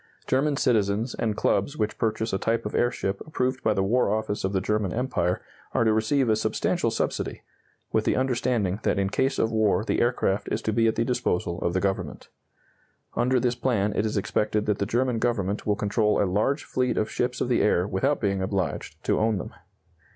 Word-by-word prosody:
German 140 Hz, +2 st, +1 dB
citizens 110 Hz, 0 st, +1 dB
and 110 Hz, -3 st, -2 dB
clubs 120 Hz, +10 st, +1 dB
which 105 Hz, 0 st, -2 dB
purchase 110 Hz, -1 st, -1 dB
a 95 Hz, -, 0 dB
type 115 Hz, +2 st, 0 dB
of 105 Hz, -, -4 dB
airship 100 Hz, -5 st, 0 dB
approved 130 Hz, -3 st, -1 dB
by -, -, +2 dB
the 95 Hz, -, +1 dB
War 120 Hz, +3 st, +2 dB
Office 110 Hz, -1 st, -2 dB
of 95 Hz, -, 0 dB
the 95 Hz, -, +1 dB
German 105 Hz, -1 st, 0 dB
Empire 90 Hz, -7 st, -1 dB, 0.3 s
are -, -, +3 dB
to 110 Hz, -1 st, +3 dB
receive 120 Hz, +5 st, +2 dB
a 110 Hz, -, +4 dB
substantial 110 Hz, -, 0 dB
subsidy, -, -, -2 dB, 0.5 s
with 110 Hz, -1 st, +2 dB
the -, -, +1 dB
understanding 120 Hz, -6 st, 0 dB
that -, -, +1 dB
in 100 Hz, 0 st, 0 dB
case 135 Hz, +5 st, +1 dB
of 110 Hz, -, +1 dB
war 110 Hz, -3 st, +2 dB
the -, -, 0 dB
aircraft 120 Hz, -5 st, 0 dB
is 110 Hz, -, -1 dB
to 110 Hz, -, 0 dB
be 115 Hz, +1 st, +3 dB
at 110 Hz, -, +1 dB
the 115 Hz, -, +1 dB
disposal 90 Hz, -8 st, -1 dB
of 85 Hz, -, -1 dB
the 95 Hz, -, +1 dB
Government. 95 Hz, 0 st, -3 dB, 0.9 s
Under 125 Hz, +2 st, +2 dB
this 125 Hz, -1 st, +1 dB
plan 115 Hz, -4 st, 0 dB
it -, -, +1 dB
is 105 Hz, -, -2 dB
expected 105 Hz, +1 st, 0 dB
that 105 Hz, -1 st, 0 dB
the 100 Hz, -, 0 dB
German 120 Hz, 0 st, +1 dB
Government 105 Hz, -4 st, -1 dB
will 105 Hz, -, +3 dB
control 105 Hz, +1 st, +1 dB
a -, -, +3 dB
large 105 Hz, +10 st, 0 dB
fleet 125 Hz, -2 st, -1 dB
of 110 Hz, -, +1 dB
ships 125 Hz, +2 st, -1 dB
of -, -, 0 dB
the 125 Hz, -, +2 dB
air 90 Hz, -3 st, +2 dB
without 105 Hz, +8 st, 0 dB
being 100 Hz, -3 st, 0 dB
obliged 95 Hz, -1 st, -3 dB
to -, -, +1 dB
own 110 Hz, -1 st, +2 dB
them. -, -, -6 dB
110 Hz, 210 wpm, -26 LUFS, 100-120 Hz, 0.9 s, a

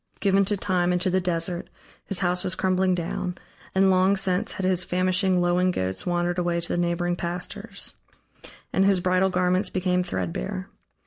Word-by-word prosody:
Given 195 Hz, -1 st, +3 dB
to 205 Hz, +1 st, 0 dB
Time 180 Hz, -2 st, +1 dB
and 180 Hz, -, +1 dB
to 185 Hz, -, +1 dB
the 185 Hz, +1 st, +2 dB
Desert, 175 Hz, 0 st, -2 dB, 0.4 s
his 195 Hz, -2 st, 0 dB
house 180 Hz, -1 st, +1 dB
was 185 Hz, -, 0 dB
crumbling 185 Hz, -1 st, +1 dB
down, 175 Hz, +1 st, -3 dB, 0.4 s
and 190 Hz, 0 st, +5 dB
long 190 Hz, +2 st, +3 dB
since 185 Hz, -1 st, +1 dB
had 190 Hz, -, -3 dB
his 185 Hz, -1 st, +2 dB
famishing, 185 Hz, +1 st, +2 dB
lowing 175 Hz, +1 st, +2 dB
goats 95 Hz, -, -2 dB
wandered 175 Hz, 0 st, 0 dB
away 175 Hz, -1 st, 0 dB
to 170 Hz, -, -4 dB
the -, -, -2 dB
neighboring 175 Hz, 0 st, 0 dB
pastures. 175 Hz, +1 st, -5 dB, 0.8 s
And 190 Hz, -, +3 dB
his 195 Hz, -1 st, +4 dB
bridal 185 Hz, +1 st, +2 dB
garments 185 Hz, +1 st, +1 dB
became 180 Hz, -1 st, 0 dB
threadbare. 90 Hz, -, -4 dB
180 Hz, 175 wpm, -25 LUFS, 175-185 Hz, 0.8 s, and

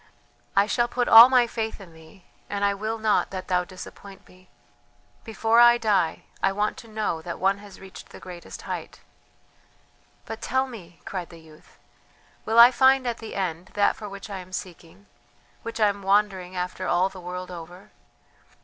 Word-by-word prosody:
I 200 Hz, +1 st, +5 dB
shall 240 Hz, +3 st, 0 dB
put 245 Hz, 0 st, -2 dB
all 230 Hz, +3 st, +10 dB
my 250 Hz, -2 st, +4 dB
faith 225 Hz, -2 st, -4 dB
in 185 Hz, -4 st, -13 dB
thee, 160 Hz, +4 st, -17 dB, 0.3 s
and 200 Hz, 0 st, -1 dB
I 200 Hz, -, +2 dB
will 215 Hz, +3 st, -4 dB
not 215 Hz, -1 st, +1 dB
that 185 Hz, -1 st, -7 dB
thou 180 Hz, -1 st, +2 dB
disappoint 190 Hz, +1 st, -12 dB
me. 185 Hz, 0 st, -21 dB, 0.7 s
Before 225 Hz, +1 st, +1 dB
I 240 Hz, 0 st, +7 dB
die, 205 Hz, -8 st, 0 dB, 0.2 s
I 195 Hz, -, +2 dB
want 210 Hz, +2 st, -1 dB
to 230 Hz, -, -12 dB
know 215 Hz, -7 st, -3 dB
that 170 Hz, +1 st, -6 dB
one 195 Hz, +1 st, +1 dB
has 200 Hz, -2 st, -14 dB
reached 190 Hz, 0 st, -12 dB
the -, -, -12 dB
greatest 175 Hz, -2 st, -10 dB
height." -, -, -7 dB, 1.2 s
"But 225 Hz, -, -7 dB
tell 260 Hz, +1 st, 0 dB
me," 185 Hz, -10 st, -12 dB
cried 185 Hz, -3 st, -5 dB
the 170 Hz, -, -13 dB
youth, 160 Hz, -1 st, -19 dB, 0.7 s
"will 225 Hz, +1 st, -1 dB
I 235 Hz, +2 st, +10 dB
find 265 Hz, +1 st, +4 dB
at 240 Hz, -1 st, -3 dB
the 225 Hz, -, -8 dB
end 180 Hz, -2 st, -3 dB
that 205 Hz, -1 st, +2 dB
for 210 Hz, -, -8 dB
which 200 Hz, 0 st, -9 dB
I 200 Hz, -2 st, -6 dB
am 185 Hz, 0 st, -12 dB
seeking, 180 Hz, +1 st, -9 dB, 0.6 s
which 230 Hz, 0 st, -7 dB
I 215 Hz, -, +5 dB
am 200 Hz, 0 st, -5 dB
wandering 195 Hz, -2 st, 0 dB
after 180 Hz, +1 st, -4 dB
all 180 Hz, +2 st, +2 dB
the 190 Hz, -1 st, -12 dB
world 180 Hz, +1 st, -7 dB
over?" 175 Hz, +2 st, -11 dB
200 Hz, 185 wpm, -25 LUFS, 180-225 Hz, 1.2 s, all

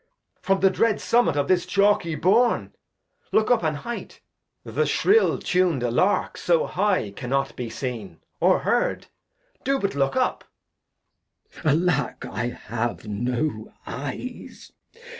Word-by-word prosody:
From 195 Hz, 0 st, +1 dB
the 195 Hz, 0 st, +5 dB
dread 220 Hz, +2 st, +1 dB
Summet 215 Hz, -11 st, +2 dB
of 140 Hz, -1 st, +1 dB
this 180 Hz, -1 st, +2 dB
chalky 200 Hz, -5 st, +2 dB
Bourn: 220 Hz, +10 st, +2 dB, 0.6 s
Look 220 Hz, +2 st, +2 dB
up, 245 Hz, -, +4 dB
an 155 Hz, -2 st, 0 dB
Height, 235 Hz, +11 st, -7 dB, 0.4 s
the -, -, -1 dB
shrill 440 Hz, +3 st, +3 dB
tun'd 180 Hz, -8 st, +1 dB
Lark 125 Hz, -, +1 dB
so 170 Hz, -2 st, +2 dB
high 190 Hz, -, 0 dB
Cannot 135 Hz, +5 st, -2 dB
be 120 Hz, -2 st, -5 dB
seen, 110 Hz, -, -6 dB, 0.2 s
or -, -, +3 dB
heard; -, -, 0 dB, 0.6 s
do 275 Hz, +1 st, +1 dB
but 200 Hz, -6 st, -1 dB
look 135 Hz, -1 st, 0 dB
up. 255 Hz, -1 st, 0 dB, 1.2 s
Glost. -, -, -3 dB
Alack, 160 Hz, -7 st, -1 dB
I 120 Hz, +2 st, -3 dB
have 120 Hz, -1 st, -4 dB
no 120 Hz, +2 st, -2 dB
Eyes. 145 Hz, -, -7 dB
160 Hz, 130 wpm, -24 LUFS, 125-200 Hz, 1.2 s, the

